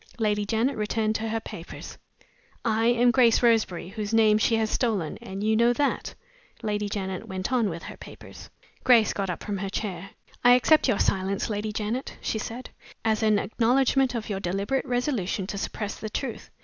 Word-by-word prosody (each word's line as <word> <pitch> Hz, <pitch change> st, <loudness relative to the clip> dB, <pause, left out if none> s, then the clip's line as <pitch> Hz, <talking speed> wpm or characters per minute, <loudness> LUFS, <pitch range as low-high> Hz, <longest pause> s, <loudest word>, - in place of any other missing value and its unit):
Lady 210 Hz, -2 st, 0 dB
Janet 235 Hz, +5 st, +1 dB
returned 215 Hz, +1 st, 0 dB
to 220 Hz, 0 st, -2 dB
her 225 Hz, +1 st, -1 dB
papers. 170 Hz, -5 st, -9 dB, 0.7 s
"I 225 Hz, 0 st, +2 dB
am 240 Hz, 0 st, +4 dB
Grace 245 Hz, -2 st, +4 dB
Roseberry, 220 Hz, -7 st, +2 dB
whose 215 Hz, +1 st, -3 dB
name 215 Hz, -1 st, +5 dB
she 225 Hz, -, +3 dB
has 220 Hz, -1 st, 0 dB
stolen, 205 Hz, -11 st, -1 dB
and 195 Hz, +1 st, -6 dB
you 220 Hz, +1 st, +2 dB
know 235 Hz, +2 st, +4 dB
that." 285 Hz, +3 st, -1 dB, 0.5 s
Lady 210 Hz, -1 st, -1 dB
Janet 190 Hz, -2 st, -4 dB
went 190 Hz, +6 st, -3 dB
on 235 Hz, -5 st, +2 dB
with 170 Hz, -1 st, -6 dB
her -, -, -9 dB
papers. -, -, -12 dB, 0.3 s
Grace 235 Hz, -4 st, +5 dB
got 195 Hz, -2 st, -2 dB
up 180 Hz, -, -4 dB
from 205 Hz, -2 st, -3 dB
her 195 Hz, 0 st, -3 dB
chair. 195 Hz, -2 st, -4 dB, 0.3 s
"I 245 Hz, 0 st, +8 dB
accept 305 Hz, +5 st, +4 dB
your 205 Hz, -, +2 dB
silence, 195 Hz, +3 st, 0 dB
Lady 210 Hz, +1 st, -2 dB
Janet," 220 Hz, +5 st, -3 dB
she 220 Hz, -, -2 dB
said, 235 Hz, +4 st, -6 dB, 0.3 s
"as 220 Hz, 0 st, +2 dB
an 215 Hz, -1 st, +4 dB
acknowledgment 255 Hz, +4 st, +2 dB
of 225 Hz, -2 st, -3 dB
your 200 Hz, -2 st, -3 dB
deliberate 200 Hz, +10 st, -1 dB
resolution 245 Hz, -7 st, -1 dB
to 200 Hz, -, -5 dB
suppress 205 Hz, +1 st, -4 dB
the 215 Hz, -, -5 dB
truth. 240 Hz, +2 st, -5 dB
220 Hz, 185 wpm, -26 LUFS, 200-235 Hz, 0.7 s, I